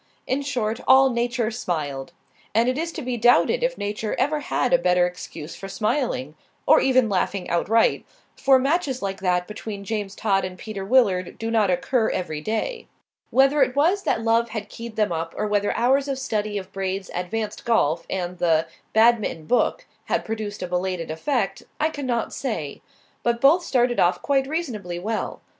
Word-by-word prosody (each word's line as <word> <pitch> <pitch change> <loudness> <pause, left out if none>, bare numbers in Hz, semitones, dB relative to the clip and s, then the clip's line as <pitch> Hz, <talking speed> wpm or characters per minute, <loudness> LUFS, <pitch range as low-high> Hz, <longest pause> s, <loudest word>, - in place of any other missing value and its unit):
In 265 +2 0
short, 240 -6 -2
all 265 0 +7
Nature 235 -1 0
smiled. 155 - -3 0.4
And 230 +2 +4
it 255 - +1
is 330 +3 -2
to 310 - -5
be 250 -1 -2
doubted 245 - +4
if - - 0
Nature 210 +1 -3
ever 295 +4 +1
had 260 -3 0
a 260 - +6
better 180 0 +3
excuse 170 -3 -7
for 195 - -8
smiling 215 - -1 0.3
or - - +6
even 255 -3 +3
laughing 195 -1 -1
outright; 225 +7 +2 0.3
for 270 -1 +5
matches 275 - 0
like 195 -1 -3
that 180 -1 +1
between 210 -1 -7
James 205 -2 -4
Todd 195 -3 +1
and 185 0 -5
Peter 205 -1 -6
Willard 195 -5 +2
do 225 0 -3
not 215 -4 +3
occur 220 +6 +1
every 160 -5 -3
day. 455 - -3 0.4
Whether 275 +3 +4
it 255 - +2
was 340 +8 +3
that 225 - 0
love 230 +1 +2
had 215 -2 -5
keyed 230 0 -8
them 210 -3 +1
up, 165 0 -3
or - - 0
whether 205 -1 +1
hours 270 +4 +2
of 275 -1 -2
study 215 -5 -2
of 190 -1 -7
Braid's 190 0 -3
"Advanced 210 +4 -3
Golf" 170 - +1
and 180 -1 -3
the 160 -2 +3 0.3
Badminton 220 -7 +3
Book 250 - +1 0.2
had - - -1
produced 215 -3 -4
a - - -3
belated 180 -2 -2
effect, 195 - -1 0.2
I 310 - +2
cannot 255 -6 -2
say; 215 - -4 0.4
but 235 0 0
both 305 +8 +5
started 245 -5 +1
off 175 +1 +3
quite 270 -2 +1
reasonably 230 - -3
well. 215 +5 -3
220 Hz, 180 wpm, -23 LUFS, 185-255 Hz, 0.4 s, all